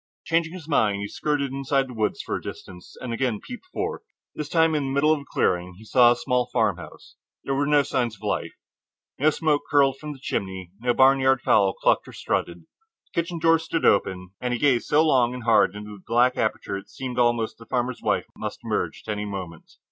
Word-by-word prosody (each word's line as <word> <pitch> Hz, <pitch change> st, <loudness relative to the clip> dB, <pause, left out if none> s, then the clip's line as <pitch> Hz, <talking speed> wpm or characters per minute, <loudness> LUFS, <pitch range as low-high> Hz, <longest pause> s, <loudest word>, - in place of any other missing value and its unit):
Changing 165 Hz, 0 st, 0 dB
his 175 Hz, -5 st, -9 dB
mind, 110 Hz, -9 st, +2 dB
he 100 Hz, -, -3 dB
skirted 140 Hz, +2 st, -1 dB
inside 135 Hz, 0 st, 0 dB
the 125 Hz, -, -9 dB
woods 110 Hz, -2 st, -1 dB
for -, -, -3 dB
a -, -, -4 dB
distance, 90 Hz, 0 st, -10 dB
and 125 Hz, -2 st, -5 dB
again 115 Hz, -3 st, -1 dB
peeped 255 Hz, +8 st, -10 dB
forth. 430 Hz, +5 st, -4 dB, 0.3 s
This 150 Hz, -1 st, -5 dB
time, 165 Hz, -1 st, +3 dB
in 150 Hz, -2 st, 0 dB
the -, -, -2 dB
middle 140 Hz, +3 st, +3 dB
of 155 Hz, -, -1 dB
the 140 Hz, -, -12 dB
clearing, 90 Hz, 0 st, 0 dB
he 110 Hz, +4 st, -15 dB
saw 120 Hz, +1 st, +6 dB
a -, -, +3 dB
small 125 Hz, 0 st, 0 dB
farmhouse. 95 Hz, -10 st, -2 dB, 0.3 s
There 135 Hz, -, -2 dB
were 140 Hz, +1 st, 0 dB
no 145 Hz, -1 st, +4 dB
signs 120 Hz, -5 st, -1 dB
of 95 Hz, -, -21 dB
life. -, -, -2 dB, 0.7 s
No 150 Hz, +3 st, +5 dB
smoke 155 Hz, -1 st, +1 dB
curled 135 Hz, -2 st, +3 dB
from 150 Hz, -1 st, -6 dB
the 135 Hz, -, -14 dB
chimney, 95 Hz, -8 st, -4 dB
not 120 Hz, +2 st, -3 dB
a -, -, +5 dB
barnyard 135 Hz, -1 st, +4 dB
fowl 100 Hz, -2 st, +3 dB
clucked -, -, +1 dB
and -, -, -11 dB
strutted. 85 Hz, 0 st, -2 dB
The 445 Hz, -, -7 dB
kitchen 170 Hz, +1 st, -6 dB
door 165 Hz, 0 st, +4 dB
stood 165 Hz, 0 st, -2 dB
open, 90 Hz, -2 st, +2 dB
and 125 Hz, -1 st, -1 dB
he -, -, -4 dB
gazed 130 Hz, -4 st, +2 dB
so 155 Hz, +2 st, +4 dB
long 125 Hz, -5 st, +3 dB
and 125 Hz, -, -7 dB
hard 105 Hz, -4 st, +4 dB
into 105 Hz, 0 st, -8 dB
the 95 Hz, -, -20 dB
black 125 Hz, +2 st, +3 dB
aperture 110 Hz, -2 st, -1 dB
that -, -, -14 dB
it -, -, -28 dB
seemed 125 Hz, -2 st, -5 dB
almost 120 Hz, -2 st, +1 dB
that 115 Hz, -, -12 dB
a -, -, -36 dB
farmer's 125 Hz, 0 st, -2 dB
wife -, -, 0 dB
must -, -, -6 dB
emerge -, -, -2 dB
at -, -, -1 dB
any 105 Hz, 0 st, -3 dB
moment. 95 Hz, -5 st, -7 dB
125 Hz, 230 wpm, -24 LUFS, 105-145 Hz, 0.7 s, saw